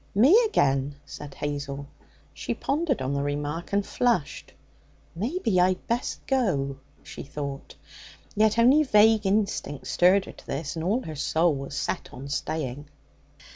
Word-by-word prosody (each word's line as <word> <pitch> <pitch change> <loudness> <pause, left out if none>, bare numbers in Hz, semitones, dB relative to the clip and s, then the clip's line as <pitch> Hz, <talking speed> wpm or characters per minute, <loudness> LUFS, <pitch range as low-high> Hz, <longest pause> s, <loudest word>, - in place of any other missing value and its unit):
'Me 260 - +6
again,' 140 - +1
said 145 -2 -9
Hazel. 140 -1 -4 0.5
She - - -4
pondered 285 - -1
on 130 +2 -1
the 140 - 0
remark 145 +3 -3
and 200 0 +1
flushed. 235 - -1 0.6
'Maybe 225 - 0
I'd 185 0 +1
best 235 +2 -3
go,' 170 - 0 0.3
she - - -9
thought. 140 0 -6 0.6
Yet 215 +1 +3
only 255 +6 +6
vague 220 -5 +4
instinct 195 -8 -1
stirred 185 +2 +4
her - - -9
to - - -17
this, 145 +2 -4
and 160 - -4
all 215 +9 0
her 155 - -7
soul 160 +3 +2
was 140 0 -5
set - - -3
on 135 +3 -8
staying. 145 -1 -3
170 Hz, 145 wpm, -26 LUFS, 140-220 Hz, 0.6 s, Me